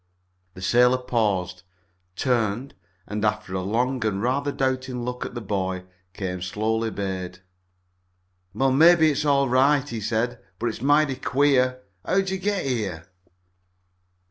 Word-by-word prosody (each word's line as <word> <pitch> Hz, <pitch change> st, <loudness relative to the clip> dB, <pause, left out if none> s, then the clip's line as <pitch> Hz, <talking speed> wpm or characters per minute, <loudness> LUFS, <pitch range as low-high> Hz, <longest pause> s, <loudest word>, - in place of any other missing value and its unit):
The 95 Hz, -, -9 dB
sailor 125 Hz, +5 st, +4 dB
paused, 105 Hz, -8 st, -1 dB, 0.5 s
turned, 120 Hz, +3 st, 0 dB, 0.3 s
and, 105 Hz, +1 st, -4 dB
after 105 Hz, -2 st, -1 dB
a 95 Hz, -, -1 dB
long 120 Hz, +6 st, 0 dB
and 105 Hz, -3 st, 0 dB
rather 135 Hz, +6 st, 0 dB
doubting 130 Hz, -2 st, -2 dB
look 125 Hz, 0 st, -4 dB
at -, -, -12 dB
the 120 Hz, -, -4 dB
boy, 95 Hz, -3 st, -2 dB, 0.3 s
came 95 Hz, -3 st, -4 dB
slowly 110 Hz, +5 st, -1 dB
bade. 95 Hz, -3 st, -4 dB, 1.1 s
"Well, 135 Hz, +5 st, +1 dB
maybe 160 Hz, +3 st, +6 dB
it's 150 Hz, +1 st, -2 dB
all 140 Hz, -1 st, +3 dB
right," 135 Hz, +3 st, +3 dB
he 115 Hz, -2 st, -5 dB
said, 115 Hz, +3 st, -1 dB, 0.2 s
"but 120 Hz, -, -1 dB
it's 110 Hz, -, -7 dB
mighty 145 Hz, 0 st, +3 dB
queer. 130 Hz, -2 st, +2 dB, 0.2 s
How'd 190 Hz, 0 st, +1 dB
ye 190 Hz, -, -2 dB
git 200 Hz, -2 st, -1 dB
here?" 100 Hz, -11 st, -2 dB
120 Hz, 140 wpm, -24 LUFS, 105-135 Hz, 1.1 s, maybe